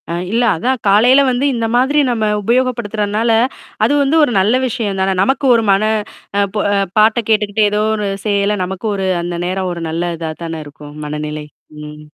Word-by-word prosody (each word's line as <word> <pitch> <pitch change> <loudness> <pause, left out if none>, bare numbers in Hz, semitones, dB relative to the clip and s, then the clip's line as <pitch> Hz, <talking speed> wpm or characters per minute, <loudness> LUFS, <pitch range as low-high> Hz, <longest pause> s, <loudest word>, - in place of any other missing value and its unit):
ஆ. - - -3 0.2
இல்ல 235 +2 +1
அதான் 250 +10 -1
காலைல 240 +7 +5
வந்து 250 +3 0
இந்த 230 -1 -1
மாதிரி 265 +4 +2
நம்ம 225 -2 -1 0.2
உபயோகப்படுத்துறதுனால, 230 -2 0 0.5
அது - - +1
வந்து 280 +3 +1
ஒரு 290 - +2
நல்ல 205 +5 +2
விஷயம் 220 -5 -3
தான. 190 0 +1
நமக்கு 270 +7 +1
ஒரு 230 - +1
மன, 195 +2 +2 0.7
ப - - -1 0.4
பாட்ட 215 +2 +4
கேட்டுக்கிட்டே, 210 -1 +2
ஏதோ 210 0 0
ஒரு 210 -1 -2 0.2
செய்யல 205 0 +1
நமக்கு 190 +4 -5
ஒரு, 195 -1 -2 0.2
அந்த 175 0 -4
நேரம் 185 +1 -2
ஒரு 170 -1 -6
நல்ல 170 +2 -2
இதா 160 -1 -4
தான 165 -1 -5
இருக்கும் 145 0 -12
மனநிலை. 150 0 -5 0.4
ம். 150 0 -10
205 Hz, 175 wpm, -16 LUFS, 175-235 Hz, 0.7 s, காலைல